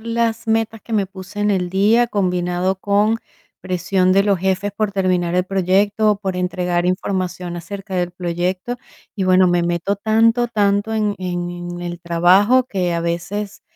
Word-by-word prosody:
las 230 0 -1
metas 225 0 0
que 230 - -9
me 205 -3 +1
puse 190 +1 -10
en 210 0 +2
el 180 -2 -1
día, 215 +6 +3
combinado 180 -2 0
con 205 +3 +2 0.4
presión 185 +1 +1
de 195 +1 +4
los 200 -2 +2
jefes 190 +2 -1
por 215 -2 0
terminar 180 -3 0
el 180 - +2
proyecto, 195 +3 +2
o - - -3
por 190 -2 -3
entregar 180 -1 -1
información 185 -1 -2
acerca 195 +3 -7
del 180 -1 0
proyecto. 180 +5 -3 0.4
Y 200 - -2
bueno, 185 0 +5
me 175 -1 +2
meto 175 +3 0
tanto, 225 +3 +2
tanto 205 -1 +1
en 210 -2 0
en 175 -1 -3
en 175 0 -7
el 175 0 -5
trabajo 185 +9 +4
que 185 -7 -2
a 170 - -1
veces, 190 +5 -4
190 Hz, 170 wpm, -19 LUFS, 180-210 Hz, 0.4 s, bueno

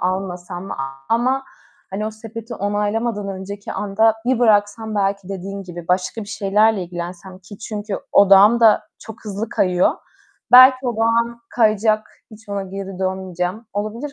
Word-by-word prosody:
almasam 180 -1 -3
mı? - - -5
A 135 +7 -3
ama, 260 +3 0 0.5
hani 210 +3 -3
o - - -3
sepeti 225 +1 -9
onaylamadan 205 +1 -2
önceki 195 +1 -6
anda 215 +2 +2
bir 255 -2 +2
bıraksam, 215 -1 +2
belki 200 -1 -1
dediğin 195 +1 -6
gibi 175 -2 -10
başka 185 +5 0
bir - - -10
şeylerle 210 0 +2
ilgilensem 175 +2 -8
ki 195 +2 -13
çünkü 210 -2 -5
odağım 200 +4 +6
da 220 -2 +5 0.2
çok 225 +1 -12
hızlı 210 +1 -4
kayıyor. 180 -5 +2 0.6
Belki 255 +1 +8
odağım 230 0 0
kayacak, 215 -1 +2 0.2
hiç 215 0 -16
ona 200 -1 -3
geri 195 0 -7
dönmeyeceğim. 190 +2 -3
Olabilir, 215 +8 -4
205 Hz, 145 wpm, -20 LUFS, 190-225 Hz, 0.6 s, Belki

